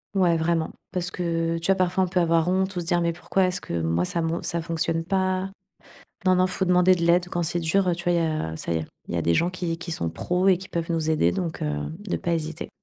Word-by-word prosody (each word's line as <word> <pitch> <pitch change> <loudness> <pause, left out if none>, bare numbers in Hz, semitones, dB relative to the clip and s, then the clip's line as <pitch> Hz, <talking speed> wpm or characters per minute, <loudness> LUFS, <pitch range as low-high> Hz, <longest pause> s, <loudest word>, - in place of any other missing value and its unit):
Ouais, 175 -4 +3
vraiment, 160 0 0 0.2
parce 180 -1 -2
que 165 -1 -1
tu 165 - -4
vois? 195 - +5
Parfois 185 0 +1
on - - -5
peut 180 +1 0
avoir 165 -1 +3
honte 190 +1 +1
ou - - -1
se 170 - -4
dire, 175 +1 +2
mais 170 0 +1
pourquoi 180 +3 0
est-ce 180 0 -1
que 85 - -3
moi 85 +2 +1
ça 170 - -1
mon 165 +1 -1
ça 170 - -2
fonctionne 165 0 -1
pas? 185 +1 0 0.7
Non, 185 0 +5
non, 185 0 +4
faut 185 +1 -1
demander 180 0 +5
de 175 - -3
l'aide 175 +1 +3
quand 175 0 -1
c'est 170 +1 -1
dur, 185 +4 +2
heu, 175 - +2
tu 175 +1 -8
vois? 175 - +2
Il - - +3
y - - +1
a 80 - -2
ça 85 - -3
y - - +1
est 80 - -5 0.2
il - - -4
y - - +1
a 85 - 0
des 85 - +2
gens 175 - +2
qui 175 -2 -3
qui 170 0 -6
sont 85 - -2
pros 180 - 0
et 185 - +6
qui 190 +2 -10
peuvent 170 0 -3
nous 160 -1 0
aider, 120 - +3
donc 165 - -3
heu, 75 -1 -1 0.2
de 205 -2 -3
pas 170 - -2
hésiter. 160 0 -3
170 Hz, 285 wpm, -25 LUFS, 165-180 Hz, 0.7 s, et